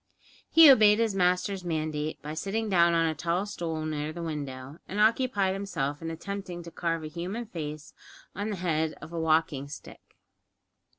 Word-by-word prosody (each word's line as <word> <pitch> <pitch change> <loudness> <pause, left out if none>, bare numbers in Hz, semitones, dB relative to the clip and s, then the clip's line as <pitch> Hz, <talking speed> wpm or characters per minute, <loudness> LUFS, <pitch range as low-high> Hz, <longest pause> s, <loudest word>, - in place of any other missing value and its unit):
He 325 -1 +9
obeyed 215 -5 +6
his 225 -2 +1
master's 180 +1 +1
mandate 155 -2 -2
by 150 +1 -5
sitting 200 +7 -2
down 170 -3 +4
on 165 0 +3
a 160 - +1
tall 170 +5 -1
stool 165 -6 -4
near 155 -1 -3
the 170 +1 -6
window, 140 -2 -6
and 200 - -4
occupied 215 -3 +2
himself 145 -8 -3
in 165 - -4
attempting 175 +1 -6
to 170 - -10
carve 165 -2 -2
a - - -4
human 180 +9 -5
face 155 -7 -7 0.4
on 205 +2 -3
the 210 - -2
head 160 -3 -1
of 165 - -11
a 170 - -2
walking 155 -3 +1
stick. 145 - -12
170 Hz, 175 wpm, -28 LUFS, 155-200 Hz, 0.4 s, He